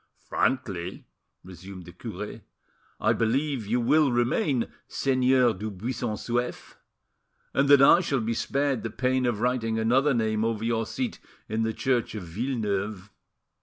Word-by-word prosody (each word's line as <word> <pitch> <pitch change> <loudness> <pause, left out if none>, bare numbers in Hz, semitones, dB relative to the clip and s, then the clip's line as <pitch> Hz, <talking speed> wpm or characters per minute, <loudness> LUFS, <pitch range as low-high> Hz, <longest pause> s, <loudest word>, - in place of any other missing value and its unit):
"Frankly," 95 -9 -1 0.4
resumed 95 0 -10
the 85 - -10
cure, 90 - -7 0.6
"I - - +3
believe 130 0 0
you 120 +4 +1
will 145 +4 +3
remain 120 - +1 0.2
Seigneur 130 -2 +3
du 105 +3 -5
Buisson 110 +3 -3
Souef, 120 +3 -3 0.8
and 140 +1 +2
that 140 -1 +8
I 170 - +8
shall 145 -7 0
be 115 +1 -1
spared 140 +1 0
the 115 - -4
pain 130 +2 0
of 110 -3 -1
writing 120 -2 0
another 130 +5 +3
name 110 -1 0
over 115 -1 -1
your 115 -1 0
seat 250 -4 -3 0.3
in 110 +1 -1
the 110 0 +1
church 120 0 -1
of 105 - -5
Villeneuve." 105 -1 -3
115 Hz, 145 wpm, -27 LUFS, 110-130 Hz, 0.8 s, that